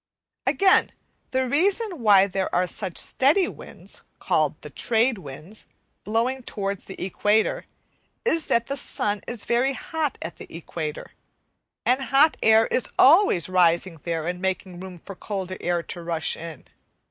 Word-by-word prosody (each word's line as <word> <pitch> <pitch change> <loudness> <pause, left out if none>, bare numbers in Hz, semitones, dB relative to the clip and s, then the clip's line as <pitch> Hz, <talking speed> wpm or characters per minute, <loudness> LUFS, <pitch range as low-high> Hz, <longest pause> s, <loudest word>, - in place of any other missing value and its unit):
Again, 390 -1 +4 0.4
the 260 0 0
reason 370 - +1
why 200 -3 +6
there 190 -1 -2
are 180 +1 +3
such 185 -1 -4
steady 310 +8 +3
winds, - - -9 0.2
called - - 0
the - - -9
trade 230 -1 +1
winds, 155 +7 -10 0.4
blowing 235 +5 0
towards 200 -4 -4
the 190 - -9
equator, 205 +3 0 0.6
is 330 -9 +2
that 235 0 +2
the 275 - -3
sun 205 -5 -1
is 240 -3 -5
very 250 +3 +1
hot 310 +1 -3
at 170 - -7
the - - -11
equator, 160 -2 -6 0.7
and 255 +2 +2
hot 275 +3 +4
air 220 0 +5
is 255 - 0
always 300 - +5
rising 175 -2 +2
there 165 -2 -3
and 180 0 -3
making 190 -1 -3
room 185 -1 -9
for 195 - -10
colder 185 -1 -5
air 175 -1 0
to 175 - -8
rush 165 -2 -1
in. 165 -3 -9
205 Hz, 150 wpm, -24 LUFS, 180-260 Hz, 0.7 s, why